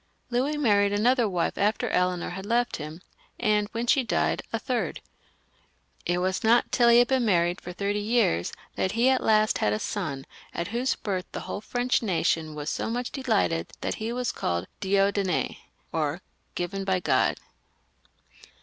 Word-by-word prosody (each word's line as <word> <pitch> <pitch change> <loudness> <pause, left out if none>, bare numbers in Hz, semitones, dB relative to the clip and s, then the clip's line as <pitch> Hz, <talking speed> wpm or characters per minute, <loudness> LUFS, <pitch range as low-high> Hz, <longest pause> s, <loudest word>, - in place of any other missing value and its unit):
Louis 270 +5 +1
married 205 -7 +3
another 235 +2 +3
wife 175 -3 -1
after 215 +4 +1
Eleanor 180 -1 0
had 190 +2 -6
left 240 +4 0
him, 155 +3 -7 0.4
and 210 -1 +2
when 230 +1 -2
she 260 +2 +3
died, 80 - 0
a - - 0
third. - - -2 1.1
It 175 +1 +1
was 185 +1 -1
not 230 +2 +4
till 240 -2 +4
he 235 - +7
had 245 0 +6
been 260 -2 +2
married 175 -5 +2
for 180 - -7
thirty 200 +3 -1
years 205 - +1 0.2
that 190 - 0
he 235 +3 +3
at 260 -1 +3
last 215 0 +3
had 105 - +2
a - - +1
son, 140 - -3 0.3
at 170 +3 -3
whose 240 +4 0
birth 185 -3 -3
the - - -4
whole - - -5
French 245 +3 0
nation 165 -6 0
was 150 0 -3
so - - -2
much 245 +2 -2
delighted 220 - 0
that - - -1
he 225 +1 -2
was 250 0 -1
called 85 0 -2 0.2
Dieudonn^ 195 -2 +1 0.3
or, 155 +2 -1 0.3
given 195 +3 -3
by 190 -1 +1
God. - - +2
200 Hz, 170 wpm, -26 LUFS, 175-235 Hz, 1.1 s, he